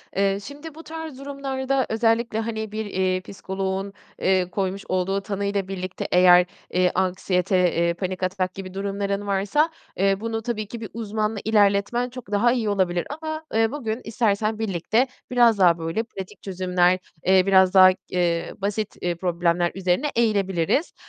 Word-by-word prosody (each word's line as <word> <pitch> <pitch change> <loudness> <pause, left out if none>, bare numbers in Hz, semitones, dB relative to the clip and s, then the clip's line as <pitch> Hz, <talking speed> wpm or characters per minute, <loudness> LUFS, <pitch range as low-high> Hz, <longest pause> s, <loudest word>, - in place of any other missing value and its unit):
Eee, 195 0 +2
şimdi 290 +4 -9
bu 325 - -10
tarz 320 -4 -7
durumlarda 275 -1 -2
özellikle, 225 0 +1
hani, 220 -1 -4
bir, 220 0 -3
eee, 185 -2 0
psikoloğun, 195 +1 -4 0.3
eee, 185 -1 +2
koymuş 195 0 -2
olduğu 185 +2 0
tanıyla 200 -1 -2
birlikte 185 -1 -5
eğer, 180 0 +7 0.3
eee, 180 0 +3
anksiyete, 185 0 +1 0.2
eee, 170 0 +2
panik 185 +1 -4
atak 185 0 -1
gibi 190 -1 -8
durumların 200 +1 -2
varsa, 200 +11 +1 0.3
eee, 195 +1 +2
bunu 225 0 -3
tabii 215 -2 -3
ki 230 +1 -8
bir 220 - -6
uzmanla 215 -1 -2
ilerletmen 210 +3 +2
çok 245 -4 -10
daha 230 +4 +3
iyi 235 -4 0
olabilir. 185 -3 0
Ama, 315 0 -4
eee, 225 +1 +2
bugün 240 -5 -3
istersen 215 -1 0
birlikte 220 +5 +1 0.2
biraz 240 -3 +5
daha, 175 -3 +5
böyle, 165 +6 -2
pratik 195 -3 -9
çözümler, 185 -1 +1 0.3
eee, 190 0 +5
biraz 190 -1 +5
daha, 185 -1 +9 0.2
eee, 170 -2 0
basit 205 +1 -3 0.3
problemler 175 -1 +1
üzerine 190 +9 +1
eğilebiliriz. 200 - +1
200 Hz, 150 wpm, -24 LUFS, 185-225 Hz, 0.3 s, daha